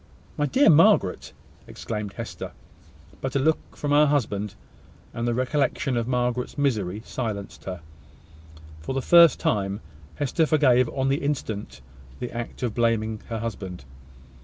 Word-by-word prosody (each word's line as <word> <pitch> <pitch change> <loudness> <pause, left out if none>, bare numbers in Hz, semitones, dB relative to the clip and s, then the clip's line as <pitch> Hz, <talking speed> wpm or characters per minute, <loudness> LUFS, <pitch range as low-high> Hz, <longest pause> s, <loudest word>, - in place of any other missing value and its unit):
"My 150 - 0
dear 270 - +4
Margaret!" 165 - +4 0.4
exclaimed 105 -2 -5
Hester: - - -7 0.7
but 135 0 -3
a - - +3
look 155 +4 0
from 145 - -2
her 150 +1 +6
husband, 105 -8 -1 0.6
and 115 0 -2
the 120 - +1
recollection 135 0 0
of 115 -1 -1
Margaret's 125 0 -1
misery, 110 -8 -1
silenced 105 -6 -5
her. 90 -2 -5 1.0
For 105 +13 -5
the 135 - -1
first 170 -3 +7
time 100 -1 0 0.4
Hester 150 +3 +1
forgave 130 -6 +4
on 135 0 -1
the 135 - +2
instant 110 - -3 0.4
the 125 - -4
act 120 +1 -6
of 120 -3 -1
blaming 110 -2 0
her 115 - -2
husband. 95 -9 -6
120 Hz, 140 wpm, -25 LUFS, 105-140 Hz, 1.0 s, first